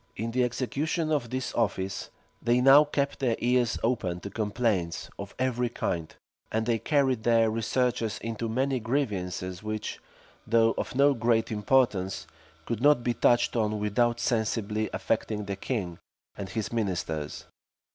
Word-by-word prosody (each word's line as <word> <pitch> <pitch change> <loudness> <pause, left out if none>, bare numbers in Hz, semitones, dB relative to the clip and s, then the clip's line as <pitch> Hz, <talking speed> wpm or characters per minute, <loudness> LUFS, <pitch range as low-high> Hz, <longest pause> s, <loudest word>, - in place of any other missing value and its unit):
In 115 +2 -3
the 125 +2 +2
execution 140 +6 -1
of 140 -6 0
this 130 +1 -3
office, 100 -4 -1 0.3
they 120 +1 +3
now 135 +3 +8
kept 140 -1 -1
their 125 -4 +1
ears 120 -2 +1
open 95 -7 0
to 100 - -7
complaints 105 -5 -1
of 100 0 -7
every 125 -1 0
kind; 85 -8 -3 0.4
and 110 0 0
they 115 -1 +1
carried 135 -5 +1
their 115 -1 +3
researches 115 -1 0
into 115 0 -4
many 130 +3 0
grievances 95 -8 -2
which, 110 0 -4 0.5
though 115 0 +4
of - - -4
no 140 +2 +5
great 115 -2 +1
importance, 105 -6 +1 0.4
could 115 -1 -3
not 145 -3 +5
be 120 - +1
touched 120 +1 +3
on 110 -2 +1
without 120 +3 +1
sensibly 110 -2 0
affecting 105 -2 -1
the 100 0 -3
king 95 -5 -3 0.4
and 95 -2 -6
his 110 +4 -3
ministers. 90 -9 -2
115 Hz, 145 wpm, -28 LUFS, 105-125 Hz, 0.5 s, now